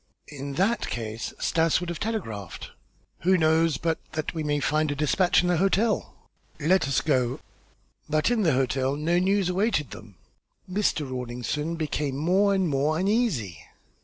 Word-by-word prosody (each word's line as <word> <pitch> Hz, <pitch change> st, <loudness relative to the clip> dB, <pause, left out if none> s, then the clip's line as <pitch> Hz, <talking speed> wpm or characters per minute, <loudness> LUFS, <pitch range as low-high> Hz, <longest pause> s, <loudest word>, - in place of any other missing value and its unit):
"In 140 Hz, -1 st, -6 dB
that 195 Hz, +10 st, 0 dB
case 110 Hz, -1 st, -4 dB
Stas 165 Hz, -1 st, +2 dB
would 175 Hz, -1 st, -5 dB
have 170 Hz, -2 st, -4 dB
telegraphed." 115 Hz, -, -5 dB, 0.5 s
"Who 185 Hz, +3 st, +3 dB
knows 160 Hz, -2 st, +3 dB
but 165 Hz, +1 st, -1 dB
that 155 Hz, 0 st, -3 dB
we 160 Hz, -2 st, -3 dB
may 145 Hz, -1 st, 0 dB
find 155 Hz, +2 st, +1 dB
a 145 Hz, -, -1 dB
despatch 165 Hz, +6 st, +2 dB
in -, -, 0 dB
the 175 Hz, -1 st, +2 dB
hotel?" 195 Hz, +5 st, +1 dB, 0.4 s
"Let 165 Hz, +1 st, +2 dB
us 140 Hz, -, +1 dB
go." 130 Hz, -4 st, 0 dB, 0.7 s
But 155 Hz, +8 st, +2 dB
in 235 Hz, -2 st, +2 dB
the 165 Hz, -7 st, +3 dB
hotel 130 Hz, +1 st, 0 dB
no 165 Hz, +4 st, +1 dB
news 190 Hz, 0 st, +2 dB
awaited 180 Hz, -, 0 dB
them. 105 Hz, -3 st, -11 dB, 0.5 s
Mr. 185 Hz, -6 st, 0 dB
Rawlinson 130 Hz, +5 st, -3 dB
became 150 Hz, -4 st, -2 dB
more 185 Hz, +7 st, +3 dB
and 190 Hz, -2 st, +1 dB
more 150 Hz, +2 st, +1 dB
uneasy. 185 Hz, -, 0 dB
155 Hz, 160 wpm, -26 LUFS, 135-180 Hz, 0.7 s, Who